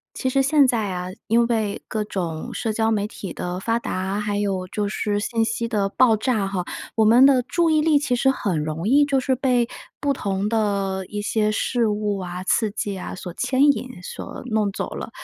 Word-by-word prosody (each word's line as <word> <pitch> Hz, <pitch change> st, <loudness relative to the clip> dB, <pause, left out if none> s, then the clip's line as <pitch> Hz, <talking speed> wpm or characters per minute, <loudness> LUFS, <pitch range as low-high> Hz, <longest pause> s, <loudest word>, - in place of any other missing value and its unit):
其 260 Hz, -, -1 dB
实 270 Hz, +1 st, +2 dB
现 280 Hz, +1 st, +4 dB
在 225 Hz, -6 st, 0 dB
啊， 180 Hz, 0 st, -4 dB, 0.2 s
因 235 Hz, +1 st, +4 dB
为 220 Hz, -4 st, -1 dB
各 215 Hz, -1 st, -2 dB
种 180 Hz, +3 st, -4 dB
社 225 Hz, -, -2 dB
交 220 Hz, +1 st, +1 dB
媒 210 Hz, -2 st, +1 dB
体 200 Hz, -4 st, -7 dB
的 180 Hz, +1 st, -4 dB
发 230 Hz, +4 st, 0 dB
达， 190 Hz, -2 st, -3 dB
还 210 Hz, -1 st, -1 dB
有 195 Hz, -3 st, -1 dB
就 205 Hz, +2 st, -2 dB
是 205 Hz, 0 st, -1 dB
信 225 Hz, +2 st, 0 dB
息 230 Hz, +1 st, -1 dB
的 205 Hz, -4 st, 0 dB
爆 240 Hz, 0 st, +4 dB
炸 215 Hz, -3 st, 0 dB
哈， 190 Hz, -2 st, -2 dB, 0.3 s
我 225 Hz, -, +4 dB
们 235 Hz, +5 st, +7 dB
的 270 Hz, -2 st, +5 dB
注 335 Hz, +7 st, +1 dB
意 310 Hz, -1 st, +3 dB
力 300 Hz, -2 st, +4 dB
其 280 Hz, -3 st, 0 dB
实 265 Hz, +2 st, +3 dB
很 180 Hz, -, -1 dB
容 155 Hz, +4 st, -3 dB
易 280 Hz, +5 st, +5 dB
就 280 Hz, -2 st, +2 dB
是 260 Hz, 0 st, +1 dB
被 250 Hz, -2 st, +2 dB, 0.3 s
不 285 Hz, -1 st, +1 dB
同 200 Hz, -4 st, -2 dB
的 200 Hz, -3 st, 0 dB
一 205 Hz, 0 st, -4 dB
些 210 Hz, 0 st, +1 dB
事 235 Hz, +2 st, 0 dB
物 210 Hz, -1 st, -1 dB
啊、 180 Hz, 0 st, -6 dB
刺 215 Hz, +2 st, +2 dB
激 200 Hz, -1 st, -3 dB
啊， 180 Hz, -, -6 dB
所 180 Hz, -2 st, -7 dB
牵 260 Hz, +8 st, +1 dB
引、 255 Hz, -8 st, -7 dB
所 -, -, -7 dB
弄 215 Hz, -4 st, 0 dB
走 -, -, -4 dB
了。 -, -, -5 dB
215 Hz, 230 characters per minute, -23 LUFS, 195-250 Hz, 0.3 s, 们